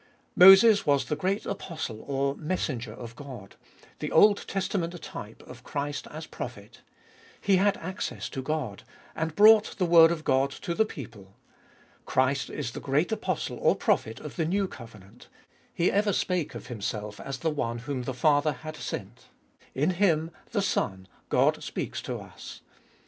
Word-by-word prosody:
Moses 195 +3 +8
was 140 -2 +2
the 150 - -2
great 195 +6 -1
apostle 155 - -5
or 140 0 0
messenger 150 -9 -3
of 120 0 -9
God, 125 -9 -10 0.4
the - - -4
Old 205 -1 +5
Testament 180 -3 -2
type 110 -7 -9
of 125 0 -13
Christ 145 +1 -4
as 155 +1 -7
prophet. - - -9 0.6
He 195 -2 +3
had 200 +1 +2
access 185 +3 -5
to 135 - -5
God, 130 -7 -3 0.3
and 160 -1 -3
brought 215 +1 +6
the 185 - +1
word 165 -1 +7
of 160 -2 -3
God 135 0 +2
to 170 +4 -5
the 220 +5 +2
people. 110 - -10 0.7
Christ 130 +1 +1
is 120 - -4
the - - -7
great 145 +8 0
Apostle 220 - -2
or - - +3
Prophet - - 0
of - - -9
the 165 - +1
New 195 +4 0
Covenant. 115 - -13 0.4
He 170 - +1
ever 205 +1 +2
spake 180 -5 -1
of - - -8
Himself 105 -2 -5
as 135 0 -5
the 160 +3 -1
one 120 -6 -2
whom 130 +2 -4
the 130 - -4
Father 145 +2 +3
had 155 0 -9
sent; - - -6 0.5
in 150 +7 +2
Him, 170 -4 +1 0.2
the 205 -4 0
Son, 95 - -1 0.2
God - - +2
speaks - - -4
to - - -4
us. - - -11
150 Hz, 165 wpm, -27 LUFS, 125-180 Hz, 0.7 s, Moses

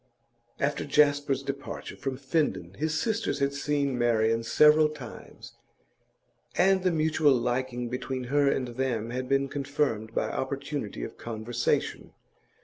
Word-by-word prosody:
After - - 0
Jasper's 145 -2 +2
departure 140 +1 -6
from 135 -2 -4
Finden 130 - -1
his 155 +1 -1
sisters 220 -9 -1
had 140 0 0
seen 140 -2 -1
Marian 115 -1 +2
several 150 +6 +5
times, 135 -6 -10 1.0
and 190 +1 +4
the 185 - +2
mutual 155 -3 +3
liking 125 0 -1
between 130 +1 -4
her 140 +3 +2
and 125 -2 -1
them 120 -2 -2
had 125 +1 -4
been 135 0 +2
confirmed 135 -6 -2
by - - +1
opportunity 135 - -4
of - - -7
conversation. 115 +1 -2
135 Hz, 130 wpm, -28 LUFS, 120-145 Hz, 1.0 s, several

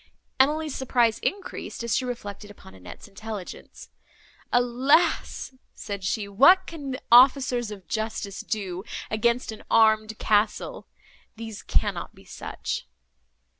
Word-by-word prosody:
Emily's 300 +2 +2
surprise 240 -4 +1
increased, 390 -10 -4
as 235 -3 0
she 255 - 0
reflected 205 -4 -6
upon 200 - -14
Annette's 90 -1 -12
intelligence. 205 -1 -9 0.6
"Alas!" 260 +5 +2 0.2
said 200 -2 -6
she, 200 +2 -1
"what 315 - +6
can 305 -6 -7
the 255 - -5
officers 255 -1 +5
of 195 -5 -10
justice 220 -2 -3
do 190 -4 -4 0.3
against 235 +2 +1
an 220 - -10
armed 220 -1 +3
castle? 210 0 0 0.5
these 225 -2 -8
cannot 70 - -2
be - - -18
such." - - -5
225 Hz, 120 wpm, -25 LUFS, 205-255 Hz, 0.6 s, what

